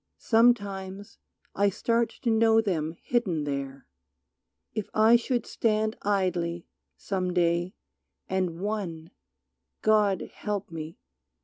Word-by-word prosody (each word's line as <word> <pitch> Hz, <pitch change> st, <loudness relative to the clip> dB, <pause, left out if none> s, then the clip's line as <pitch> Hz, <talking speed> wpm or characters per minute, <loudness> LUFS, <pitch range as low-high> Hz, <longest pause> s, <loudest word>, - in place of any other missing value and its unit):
Sometimes 205 Hz, -4 st, +1 dB, 0.3 s
I 200 Hz, +1 st, +3 dB
start 230 Hz, +3 st, +1 dB
To 235 Hz, -, +2 dB
know 225 Hz, 0 st, +5 dB
them 165 Hz, -8 st, -1 dB
hidden 195 Hz, -11 st, 0 dB
there. 140 Hz, -1 st, -4 dB, 0.9 s
If 215 Hz, -, -4 dB
I 220 Hz, +2 st, +6 dB
should 240 Hz, 0 st, 0 dB
stand 215 Hz, -1 st, 0 dB
Idly, 180 Hz, -4 st, 0 dB, 0.3 s
some 185 Hz, -2 st, -2 dB
day, 175 Hz, +1 st, +1 dB, 0.5 s
and 185 Hz, -3 st, -1 dB
one, 185 Hz, -6 st, -4 dB, 0.7 s
God 210 Hz, -3 st, +2 dB
help 205 Hz, -4 st, -4 dB
me! 160 Hz, 0 st, -7 dB
195 Hz, 105 wpm, -27 LUFS, 170-220 Hz, 0.9 s, I